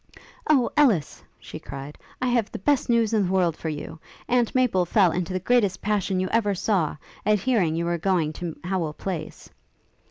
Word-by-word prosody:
'O 270 -6 +3
Ellis,' 225 - +2 0.2
she - - -9
cried, 140 +2 -8 0.3
'I - - +1
have 235 -3 +1
the - - -5
best 275 +7 +1
news 230 -2 +2
in 205 -4 +2
the - - -3
world 180 -4 +2
for 160 - -5
you! 155 +1 -6 0.3
Aunt 245 -1 +1
Maple 245 -8 +3
fell 180 0 +3
into 180 +1 -2
the 185 - -1
greatest 200 -2 +2
passion 195 -2 0
you 185 - 0
ever 205 -3 +1
saw, 180 -6 0 0.3
at 215 0 +3
hearing 195 -10 +1
you 170 +1 -1
were 170 0 -1
going 165 -4 +1
to 170 -1 -6
Howel 175 -4 -2
Place. 165 -2 -6
190 Hz, 190 wpm, -24 LUFS, 170-225 Hz, 0.3 s, O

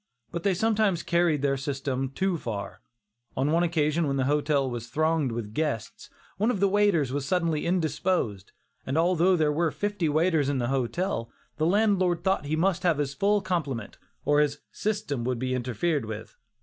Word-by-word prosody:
But 170 - -3
they 195 +1 +1
sometimes 215 -3 +1
carried 170 -4 +2
their 135 -1 +2
system 135 -1 -2
too 190 +7 -1
far. 105 -10 -5 0.6
On 135 +3 +1
one 165 +2 +3
occasion 160 -2 +1
when 140 0 0
the 135 - +1
hotel 145 0 +1
was 120 -2 -5
thronged 155 +1 +1
with 115 -2 -5
guests, 145 -6 -3 0.3
one 215 +5 +2
of 215 - 0
the 200 - +4
waiters 195 -9 +2
was 145 -1 -1
suddenly 170 -3 0
indisposed, 165 - -1 0.3
and 135 +4 -2
although 175 +2 +3
there 155 -3 +2
were 165 +2 +1
fifty 180 +3 -1
waiters 155 -2 +2
in 140 - 0
the 120 -1 -1
hotel, 135 0 -1 0.3
the 155 - +1
landlord 190 -3 +2
thought 190 -5 +1
he 150 +2 -1
must 180 +3 +1
have 170 -4 +2
his 140 -2 -1
full 205 +7 +2
complement, 145 - -3 0.3
or 145 0 +4
his 145 -1 +1
"system" 205 - -2
would 125 0 -1
be 130 +1 -2
interfered 130 +3 -1
with. 110 0 -7
155 Hz, 180 wpm, -27 LUFS, 135-180 Hz, 0.6 s, the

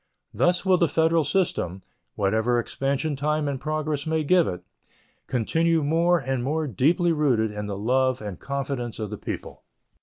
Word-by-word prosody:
Thus 180 +2 +2
will 185 -2 +4
the 170 - +4
federal 160 +1 +2
system, 100 - -1 0.3
whatever 110 +4 +1
expansion 140 +5 -1
time 150 +2 0
and 135 -2 -3
progress 155 -1 -2
may 160 0 +1
give 175 +3 +4
it, 90 0 -5 0.6
continue 165 +7 +1
more 165 +4 +3
and 135 -4 -2
more 155 +4 -1
deeply 160 - +2
rooted 130 -9 +1
in 105 0 -5
the 100 -1 -4
love 130 +4 +1
and 105 -4 -7
confidence 135 -4 -4
of 110 -2 -5
the 105 - -6
people. - - -6
140 Hz, 160 wpm, -25 LUFS, 120-160 Hz, 0.6 s, will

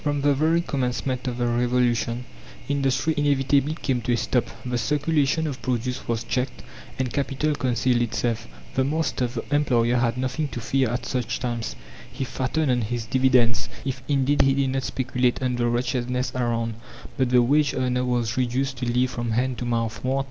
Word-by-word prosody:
From 145 -1 0
the 145 0 +4
very 160 +4 +2
Commencement 130 -3 -2
of 120 -1 -2
the 120 - 0
Revolution 120 0 +1 0.4
industry 135 +1 +1
inevitably 145 0 +2
came 130 -6 -1
to 120 - 0
a - - +2
stop 120 0 +1 0.2
the 125 -1 -1
circulation 150 +3 +1
of 140 -4 -4
produce 125 +1 -2
was 115 -1 -1
checked, 125 +1 -2 0.3
and 125 -3 -2
capital 140 +2 0
concealed 125 -2 +1
itself. 120 0 -1 0.3
The 130 - +2
master 145 -3 0
the 120 -1 -5
employer 125 -5 +3
had 120 0 +1
nothing 130 +4 -1
to - - -3
fear 130 +1 +1
at 120 +2 -3
such 125 -3 -2
times, 120 - -3 0.4
he - - -4
fattened 130 +3 0
on 125 -1 +2
his 115 +1 -2
dividends, 125 -2 +3 0.2
if 130 -1 -3
indeed 140 0 +3
he 135 0 +4
did 135 -1 +1
not 135 0 0
speculate 130 -1 0
on 125 -1 0
the 120 0 +1
wretchedness 125 +1 -1
around; 115 -2 -1 0.4
but 130 -2 +1
the 125 -1 +5
wage 145 +3 +3
earner 125 -1 0
was 120 -2 0
reduced 130 +1 0
to 120 -1 -1
live 125 +1 +2
from 120 -1 -3
hand 125 +1 0
to 125 - -3
mouth. 115 -3 -1
125 Hz, 180 wpm, -24 LUFS, 120-135 Hz, 0.4 s, the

